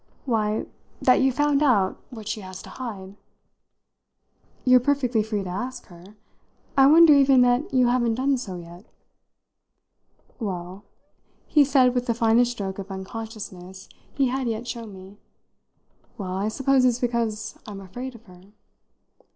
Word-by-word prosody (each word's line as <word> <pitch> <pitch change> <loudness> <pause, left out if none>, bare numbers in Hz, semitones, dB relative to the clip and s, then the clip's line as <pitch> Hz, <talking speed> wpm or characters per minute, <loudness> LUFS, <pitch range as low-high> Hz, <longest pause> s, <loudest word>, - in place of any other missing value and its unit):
"Why, 215 -4 0 0.3
that 255 - +4
you've 265 -1 +2
found 290 0 +2
out 210 -10 +2
what 220 -5 -10
she 215 0 -3
has 185 -1 -9
to - - -12
hide." 205 -6 -8 1.5
"You're 255 0 +6
perfectly 250 -3 +1
free 210 -2 -3
to 185 - -6
ask 245 +8 -5
her. 180 +4 -15 0.6
I 270 -1 +6
wonder 320 +1 +8
even 275 -2 +5
that 245 +4 +2
you 255 -1 +3
haven't 240 -2 +1
done 270 +2 +1
so 195 -7 -6
yet." 175 +3 -11 1.5
"Well," 190 -2 -6 0.6
he 300 -3 +4
said 260 -2 +3
with 245 -1 -2
the 235 - 0
finest 235 +1 +3
stroke 195 -4 -5
of 195 0 -7
unconsciousness 190 -2 -8 0.2
he 270 -3 +1
had 260 0 -2
yet 230 +1 -3
shown 230 -3 -6
me 190 +1 -13 1.0
"well, 190 -4 -5
I 195 +2 -1
suppose 270 +3 +2
it's 245 -2 +3
because 230 -3 -2
I'm 205 -2 -7
afraid 245 +7 -8
of 230 - -15
her." 180 -2 -16
230 Hz, 150 wpm, -24 LUFS, 195-255 Hz, 1.5 s, wonder